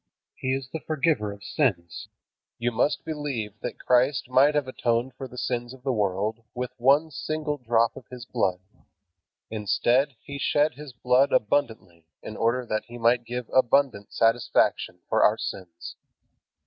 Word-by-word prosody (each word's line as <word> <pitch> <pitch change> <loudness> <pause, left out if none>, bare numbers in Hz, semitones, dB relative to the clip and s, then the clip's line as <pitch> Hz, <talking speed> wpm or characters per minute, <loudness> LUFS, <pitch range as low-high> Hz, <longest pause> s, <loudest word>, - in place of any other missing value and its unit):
He 130 0 -2
is 135 -1 -5
the 160 - -4
Forgiver 150 -9 0
of 100 0 -11
sins. 100 - -1 0.5
You 120 +1 -1
must 145 +6 0
believe 140 -9 -3
that 120 - -5
Christ 125 +1 +2
might 140 +4 +5
have 145 -3 +1
atoned 120 0 -1
for 135 +1 -7
the 125 - -13
sins 120 0 -3
of 130 - -20
the 135 -1 0
world 105 +2 -1
with 125 0 -3
one 140 +6 +4
single 150 0 -3
drop 115 -1 +2
of - - -12
His 125 -2 -9
blood. 95 -7 -1 0.9
Instead, 120 +5 +1
He 140 0 -8
shed 150 +2 +2
His 150 -1 -10
blood 125 +3 +2
abundantly 105 - -1 0.2
in 110 - -7
order 120 +3 0
that 110 -2 -2
He 120 - -10
might 120 +1 +2
give 125 -1 -5
abundant 130 -4 +2
satisfaction 115 +1 +1
for - - +2
our - - +4
sins. 85 -2 -7
125 Hz, 160 wpm, -26 LUFS, 110-135 Hz, 0.9 s, might